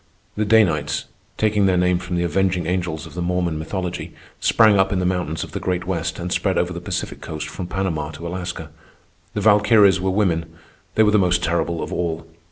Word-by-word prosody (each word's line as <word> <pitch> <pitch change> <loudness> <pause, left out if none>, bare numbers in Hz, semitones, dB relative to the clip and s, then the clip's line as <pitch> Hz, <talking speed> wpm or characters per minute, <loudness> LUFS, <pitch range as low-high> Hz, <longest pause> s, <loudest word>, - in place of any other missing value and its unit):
The 105 - 0
Danites, 85 -10 +2 0.3
taking 105 -2 +2
their 95 -1 +2
name 90 0 +2
from 90 0 -4
the 85 - +1
avenging 90 +1 0
angels 85 -3 -2
of - - -12
the 90 - -4
Mormon 85 -2 -1
mythology, 90 +2 -4 0.2
sprang 110 -3 +4
up 95 0 +3
in 95 - 0
the 90 - 0
mountains 90 -4 -1
of - - -9
the - - -4
Great 90 -1 -2
West 85 -3 -2
and 90 0 -5
spread 95 -2 0
over 90 +1 0
the 85 - -6
Pacific - - -4
Coast 80 -1 -5
from 90 - -6
Panama 85 -6 -2
to 80 +2 -9
Alaska. 85 -3 -5 0.6
The - - -1
Valkyries 105 -2 +5
were 95 - 0
women. 85 -5 0 0.4
They 110 - +5
were 105 - +4
the 105 - +4
most 90 -1 +2
terrible 85 0 0
of - - -5
all. 85 -2 -2
90 Hz, 205 wpm, -21 LUFS, 85-95 Hz, 0.6 s, Valkyries